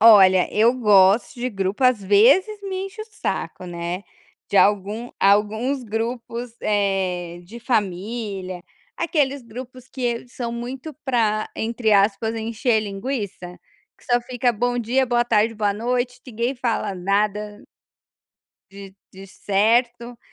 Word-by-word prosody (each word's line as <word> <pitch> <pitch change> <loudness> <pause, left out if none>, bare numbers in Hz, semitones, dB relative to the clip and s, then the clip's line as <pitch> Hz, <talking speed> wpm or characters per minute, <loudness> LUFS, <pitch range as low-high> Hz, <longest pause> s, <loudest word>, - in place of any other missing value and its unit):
Olha, 195 -4 +7
eu 230 +3 +4
gosto 205 -3 +4
de 250 - 0
grupo, 195 +2 -2
às 250 -5 +3
vezes, 275 - +4
me 385 -1 -4
enche 390 +3 -10
o - - -10
saco, 425 - -4
né, 175 +1 -4 0.5
de - - -1
algum 205 +4 +2
alguns 220 +7 +2
grupos, 230 +1 -4
eh, 190 -4 -1
de 230 +7 -11
família, 200 -4 -2 0.3
aqueles 285 -5 0
grupos 250 +2 -10
que 245 -2 -3
são 240 -1 -5
muito 250 +5 -6
pra, 220 -5 +1
entre 225 -1 0
aspas, 205 +2 +2
"encher 225 +1 0
linguiça", 200 -4 -5 0.4
que - - -24
só 245 0 +2
fica 245 0 0
"bom 245 +3 -1
dia", 250 +3 +1
"boa 240 -1 +2
tarde", 225 -1 +2
"boa 210 -2 0
noite", 245 +3 -2
ninguém 240 +2 -2
fala 235 -5 -2
nada 205 +2 -1 1.1
de 195 -1 -11 0.2
de 195 +1 -11
certo. 235 +5 0
225 Hz, 130 wpm, -22 LUFS, 200-245 Hz, 1.1 s, Olha